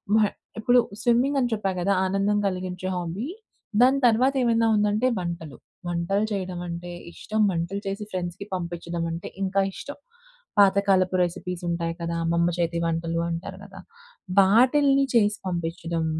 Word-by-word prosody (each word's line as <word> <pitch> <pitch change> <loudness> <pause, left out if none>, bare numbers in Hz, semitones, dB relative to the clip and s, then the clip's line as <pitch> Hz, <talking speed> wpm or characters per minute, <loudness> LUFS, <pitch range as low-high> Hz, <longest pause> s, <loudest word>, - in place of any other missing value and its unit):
ఉ - - +6 0.4
ఇప్పుడు 245 +3 +4 0.2
స్విమ్మింగ్ 245 +4 +2
అని 245 -2 +1
చెప్పా 205 -3 -1
కదా 195 +3 +2
ఆనందం 195 +2 +1
కలిగించే 185 -1 -4
హాబీ. 175 +5 -3 0.6
దాని 260 +2 +5
తర్వాత 250 +4 +3
ఏమైనా 230 -1 +3
ఉందంటే 210 +3 +2
వంటలు. 170 -4 -5 0.3
వంటలు 175 +5 0
చేయడం 185 -3 -3
అంటే 175 +1 -6 0.2
ఇష్టం. 215 0 -2
వంటలు 175 +3 -2
చేసి 195 +2 -3
ఫ్రెండ్స్‌కి 180 +1 -4
పంపించడం 170 -1 -4
అంటే 165 +1 -5 0.2
ఇంకా 195 +1 +1
ఇష్టం. 285 - -8 0.6
పాతకాలపు 195 -2 +4
రెసిపీస్ 180 0 -4
ఉంటాయి 170 -1 -1
కదా. 170 0 -2
అమ్మమ్మ 170 +1 +2
చేతి 170 0 0
వంటలు 165 0 -1
అంటారు 170 +3 -5
కదా, 195 -1 -12 0.6
వాటిల్ని 270 +7 +5
చేసి 210 -2 +3
పంపించడం. 165 -1 -2
185 Hz, 135 wpm, -25 LUFS, 170-210 Hz, 0.6 s, ఉ